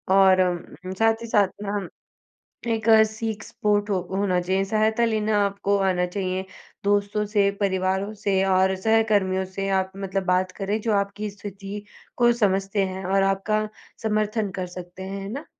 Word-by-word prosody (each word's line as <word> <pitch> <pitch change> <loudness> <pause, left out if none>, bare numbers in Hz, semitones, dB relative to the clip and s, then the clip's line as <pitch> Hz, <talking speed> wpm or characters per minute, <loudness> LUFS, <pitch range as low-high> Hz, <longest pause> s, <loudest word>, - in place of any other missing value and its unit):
और 190 -1 +6
अम, 180 0 -2
साथ 225 0 +3
ही 230 - -6
साथ 205 -3 +4 0.2
ना, 200 -2 -2 0.8
एक 225 -1 0 0.2
सीक 220 0 -4
स्पोर्ट 205 0 0
हो 195 -3 +1
होना 190 -2 +1
चाहिए, 190 +2 0
सहायता 220 +3 +2
लेना 215 -1 +1
आपको 200 0 0
आना 180 -1 +1
चाहिए, 185 0 -3 0.4
दोस्तों 205 +1 +1
से, 205 -1 +2
परिवारों 190 +1 0
से 200 -2 0
और 190 0 +3
सहकर्मियों 200 -2 +2
से 195 0 -1
आप 190 0 -7
मतलब 195 0 -2
बात 185 0 +1
करें 205 +2 -1
जो 220 -1 0
आपकी 200 +1 -1
स्थिति 200 0 -8 0.3
को 240 -1 +5
समझते 195 0 +1
हैं 190 0 -5
और 195 +1 +2
आपका 215 +2 +1 0.4
समर्थन 215 -1 0
कर 180 - -2
सकते 180 +1 -8
हैं 195 +1 -5
ना? 280 +7 -6
200 Hz, 160 wpm, -24 LUFS, 190-215 Hz, 0.8 s, और